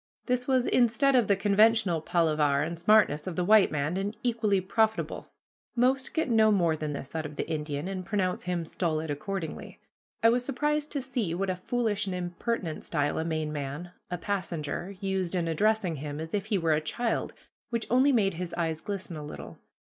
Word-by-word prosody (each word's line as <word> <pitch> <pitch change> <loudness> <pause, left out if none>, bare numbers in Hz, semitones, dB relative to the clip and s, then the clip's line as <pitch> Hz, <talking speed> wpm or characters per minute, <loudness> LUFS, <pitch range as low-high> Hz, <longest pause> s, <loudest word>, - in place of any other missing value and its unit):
This 250 -1 0
was 260 -2 +3
instead 255 +3 +3
of 240 -5 +4
the 200 - +4
conventional 205 -3 +3
palaver 155 -4 +2
and 165 +1 -4
smartness 190 -6 +4
of 180 - -3
the 180 - 0
white 215 0 +6
man, 150 +4 -1
and 200 +3 -3
equally 225 -5 +2
profitable. 220 +4 0 0.5
Most 260 +2 +1
get 320 - +1
no 220 -3 +4
more 170 -6 +3
than 155 -1 -4
this 140 -1 -7
out 155 -1 -2
of 150 - -11
the - - -3
Indian, 150 0 -3
and 190 -1 -4
pronounce 185 -2 -1
him 175 -2 -1
stolid 160 -2 -2
accordingly. 165 +2 -5 0.4
I 230 - +7
was 245 +1 +2
surprised 295 +3 -1
to 280 -3 -2
see 235 -10 -2
what 190 +1 -1
a - - -2
foolish 210 +1 -1
and 185 - -2
impertinent 175 0 -3
style 145 +1 -1
a - - 0
Maine 155 -2 -2
man, 145 +4 -5 0.2
a 180 - -2
passenger, 175 -1 -3
used 190 -2 -1
in 170 -2 0
addressing 190 0 +1
him, 145 +1 -5
as 160 +1 -6
if 205 0 -1
he 215 -3 +1
were 165 -3 +2
a 155 - +1
child, 230 +9 -2 0.3
which 235 -2 -1
only 260 +3 +5
made 205 -7 +2
his 175 +1 -5
eyes 160 -2 -1
glisten 195 -2 -5
a 150 - -6
little. 150 - -9
185 Hz, 195 wpm, -28 LUFS, 160-220 Hz, 0.5 s, I